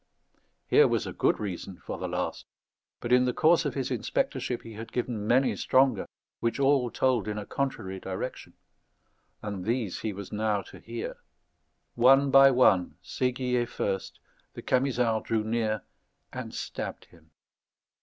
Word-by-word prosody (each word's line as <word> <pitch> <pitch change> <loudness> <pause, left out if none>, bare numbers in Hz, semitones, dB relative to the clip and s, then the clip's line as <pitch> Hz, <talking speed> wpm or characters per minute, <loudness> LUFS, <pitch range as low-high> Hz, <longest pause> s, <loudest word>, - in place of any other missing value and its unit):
Here - - +5
was - - 0
a - - -5
good - - +1
reason 95 -2 -5
for - - -7
the - - -3
last; - - -3 0.5
but 120 - 0
in 125 0 +5
the 125 - 0
course 165 +1 +4
of 140 - -2
his 135 -2 -2
inspectorship 120 - -2
he 115 - -10
had 110 +1 -8
given 120 -4 -3
many 130 +3 +3
stronger 130 -5 +2 0.3
which 115 +3 -1
all 135 -3 +3
told 125 -4 +1
in 105 0 -3
a 105 - -5
contrary 95 -9 -3
direction; 95 +7 -6 0.9
and 100 -3 -4
these 115 -2 -1
he 110 - -2
was 100 -1 -8
now 105 -1 0
to - - -13
hear. 115 0 -6 0.8
One 135 +3 +5
by 135 0 +8
one, 95 - +3
Séguier 125 +1 -1
first, 95 -4 -3 0.4
the - - -8
Camisards 125 -4 +1
drew 110 -1 +1
near 110 -1 -1 0.5
and - - -6
stabbed - - -5
him. 80 -2 -22
115 Hz, 155 wpm, -28 LUFS, 105-130 Hz, 0.9 s, by